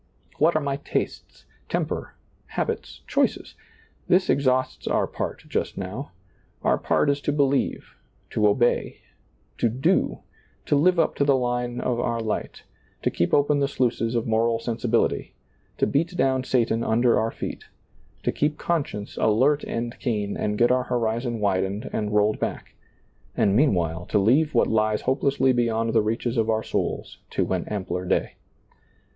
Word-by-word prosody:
What 160 +3 +4
are 155 - +2
my 140 -1 -1
tastes, 145 - -4 0.2
temper, - - -2 0.3
habits, - - -4
choices? - - 0 0.5
This 185 +1 +3
exhausts 130 -2 0
our - - +2
part - - -5
just - - -2
now. 105 +9 -5 0.5
Our - - +2
part - - +1
is 140 0 -2
to 145 - 0
believe, 140 -1 0 0.3
to 105 - +3
obey, 120 +4 +1 0.6
to 120 - +3
do, 125 +4 +1 0.4
to - - +2
live 180 +5 +4
up 165 - +2
to - - +3
the 140 -1 +4
line 120 -1 -1
of 120 -2 -1
our 115 -1 -1
light, 110 -2 -4 0.4
to - - +1
keep 85 - 0
open 145 0 +3
the 140 - +2
sluices 120 -3 0
of 115 - 0
moral 115 +1 +2
sensi 115 +1 -3
bility, 115 0 +1 0.4
to - - +2
beat 165 +5 0
down 130 -1 +2
Satan 115 -3 +1
under 115 +2 +3
our 110 - 0
feel, - - -5 0.6
to - - +1
keep 150 +1 0
conscience 140 -12 -2
alert 130 +7 +3
and 120 +1 -3
keen 105 -5 -1
and 105 0 -1
get 120 +2 +4
our 125 0 +2
horizon 120 0 -1
widened 100 0 0
and 105 -1 -1
rolled 105 +1 +3
back, - - -4 0.6
and 100 -1 +3
meanwhile 85 - +1
to - - +1
leave 130 +9 +3
what 115 - +5
lies 110 -1 +1
hopelessly 135 0 +2
beyond 115 -2 0
the 115 - +4
reaches 115 +3 -1
of 115 0 +1
our 110 0 +1
souls - - -3
to - - -1
an - - -1
ampler 95 -3 -3
day. 90 - -1
120 Hz, 160 wpm, -24 LUFS, 110-135 Hz, 0.6 s, what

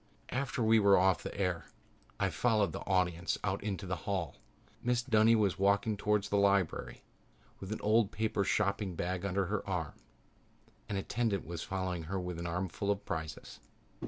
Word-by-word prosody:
After 130 -1 -1
we 110 0 +5
were 100 -1 +6
off 95 0 +3
the - - -6
air 90 -3 0 0.5
I 95 -2 +1
followed 105 +1 +2
the - - -5
audience 90 -2 +1
out 95 0 -1
into 100 -3 -3
the 90 -1 -2
hall. 95 -4 -2 0.5
Mrs. 120 0 0
Dunny 110 +1 +6
was 100 -5 +1
walking 100 +2 +2
towards 105 0 0
the 100 - +2
lobby 100 -3 +1 0.6
with 95 +1 -7
an 110 - -3
old 110 0 +3
paper 110 -2 0
shopping 100 -1 0
bag 90 +2 -2
under 100 0 0
her 105 +2 -2
arm. 80 -6 -2 1.0
An 100 - -2
attendant 105 0 -1
was 85 0 -5
following 95 -3 -3
her 95 +3 -2
with 90 -2 -4
an 85 - -3
armful 90 +3 -2
of 100 0 0
prizes. 80 -1 -5
100 Hz, 170 wpm, -32 LUFS, 90-105 Hz, 1.0 s, were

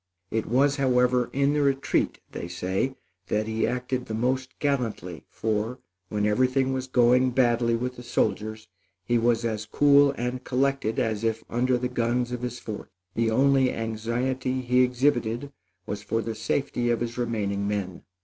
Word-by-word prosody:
It 110 -1 -1
was, 135 +4 +3
however, 125 -2 +2
in 140 +1 +2
the 150 - +1
retreat 140 -1 +1
they 85 - -5
say 95 +9 -2 0.3
that 105 0 0
he 110 0 0
acted 125 0 -2
the 110 - -3
most 130 +2 -1
gallantly, 115 - -2
for, 110 +3 -2 0.3
when 105 -1 0
everything 130 +5 +2
was 130 0 -3
going 125 0 +4
badly 120 -2 +2
with 125 +2 -3
the - - -8
soldiers, 110 -2 -1 0.4
he 120 +3 +2
was 115 0 +2
as 105 -2 -2
cool 145 +3 +5
and 125 +1 -3
collected 135 -3 0
as 110 -1 0
if 115 0 0
under 125 +2 +2
the 125 +1 -1
guns 120 0 0
of 125 -1 -4
his 125 -1 -4
fort. 110 -3 -7 0.2
The 115 0 +1
only 135 +2 +3
anxiety 120 +4 -2
he 125 0 +3
exhibited 125 0 +1 0.3
was 100 0 -4
for 115 +2 -1
the 115 +1 -3
safety 120 +2 -1
of 120 -1 +1
his 120 +1 -3
remaining 100 -4 -1
men." 100 -3 -3
120 Hz, 165 wpm, -26 LUFS, 110-130 Hz, 0.4 s, cool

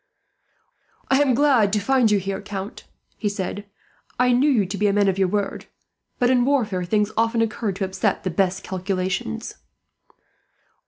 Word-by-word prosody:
"I 270 +1 +5
am 265 -4 +3
glad 255 -7 +3
to 210 - +2
find 255 0 +2
you 210 - +3
here, 195 +1 -3
Count," 200 0 -7 0.3
he 210 - -1
said. 200 0 -5 0.5
"I 250 0 +4
knew 255 +5 +3
you 230 -8 +3
to 190 +3 -5
be 210 - +2
a 200 - +2
man 205 0 +3
of 195 0 0
your 190 - +3
word, 200 +2 -3 0.5
but 245 0 +2
in 250 -1 +3
warfare 230 -9 0
things 210 +3 +1
often 230 +1 +1
occur 225 -1 -2
to 195 +1 -2
upset 190 0 -1
the 185 - -2
best 190 +2 0
calculations." 185 - -3
205 Hz, 170 wpm, -22 LUFS, 190-240 Hz, 0.5 s, I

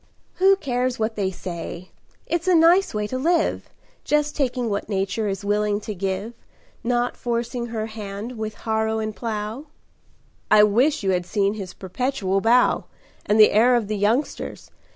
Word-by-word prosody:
"Who 385 +1 +5
cares 255 -7 -1
what 220 0 -1
they 195 -2 0
say? 175 -1 -7 0.3
It's 340 +1 -2
a 365 - +5
nice 345 +4 +5
way 210 -1 -2
to 255 +5 -3
live, 330 +3 +1 0.3
Just 300 0 +1
taking 250 -4 -1
what 200 -1 -3
Nature 200 +2 -1
is 195 0 -4
willing 205 0 +1
to 210 +1 -5
give, 195 +4 -3 0.5
Not 245 0 0
forcing 235 0 -3
her 225 -2 -3
hand 215 +1 -7
with 220 -1 -5
harrow 220 0 0
and 215 -1 -3
plow." 225 +4 -4 0.8
"I 210 - +7
wish 245 +7 +2
you 190 - +2
had 180 -1 -1
seen 200 0 +1
his 195 -4 -7
perpetual 195 -1 -1
bow 240 +3 +3 0.4
And 210 +1 +3
the 215 - +8
air 240 +4 +5
of 230 -4 0
the 215 - -1
youngsters! 220 +8 -1
220 Hz, 165 wpm, -23 LUFS, 205-250 Hz, 0.8 s, the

